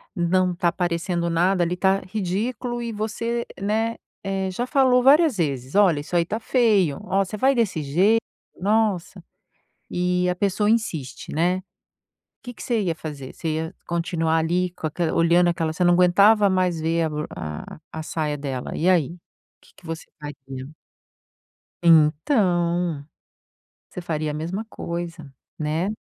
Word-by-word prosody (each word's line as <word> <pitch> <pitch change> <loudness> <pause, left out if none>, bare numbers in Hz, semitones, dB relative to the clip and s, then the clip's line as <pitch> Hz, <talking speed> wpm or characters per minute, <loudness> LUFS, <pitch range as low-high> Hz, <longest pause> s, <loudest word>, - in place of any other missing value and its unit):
não 180 +1 +1
tá 175 0 +2
aparecendo 170 0 -1
nada 175 +2 +2
ali, 175 +1 -1
tá 190 +1 +2
ridículo, 220 +6 -3
e 230 -1 -4
você, 230 +3 -2 0.2
né, 220 +3 0 0.3
eh, 195 -1 -2
já 235 +7 -2
falou 255 -2 +3
várias 295 +1 +5
vezes: 140 -5 -2
"Olha, 185 -7 +5
isso 150 +4 -6
aí 170 - +4
tá 215 +6 -3
feio, 215 - +2
ó, 195 +1 +1
você 215 - -6
vai 265 +6 +3
desse 220 - 0
jeito, 190 +11 +3 0.4
nossa.", 200 -2 0 0.7
e 180 0 0
a 180 - 0
pessoa 200 +2 +1
insiste, 175 - -2
né. 180 +4 +1 0.8
Que 245 -1 -8
você 235 -3 -1
ia 175 -5 -1
fazer, 145 -5 -8
você 165 - -5
ia 160 +1 -3
continuar 170 -1 0
ali 175 +3 0
com 155 - -3
aque 165 +3 -3
olhando 170 +1 +4
aquela 165 -2 -1
você 180 +3 -1
não 175 0 +5
aguentava 200 +4 +5
mais 180 -3 +1
ver 165 +1 +1
a - - +1
b 150 - -6 0.2
a 75 - -7
a 160 - -5
saia 155 -1 -2
dela, 135 -3 -5
e 175 - +2
aí, 170 -3 +2 0.5
que - - -23
que - - -19
você 165 0 -6
faria? 135 -2 -8 1.1
Então, 170 - +3 0.8
você - - -6
faria 155 -3 -2
a - - -4
mesma 170 +8 -4
coisa, 170 -6 -6 0.3
né. 155 +4 -1
175 Hz, 155 wpm, -23 LUFS, 160-205 Hz, 1.1 s, várias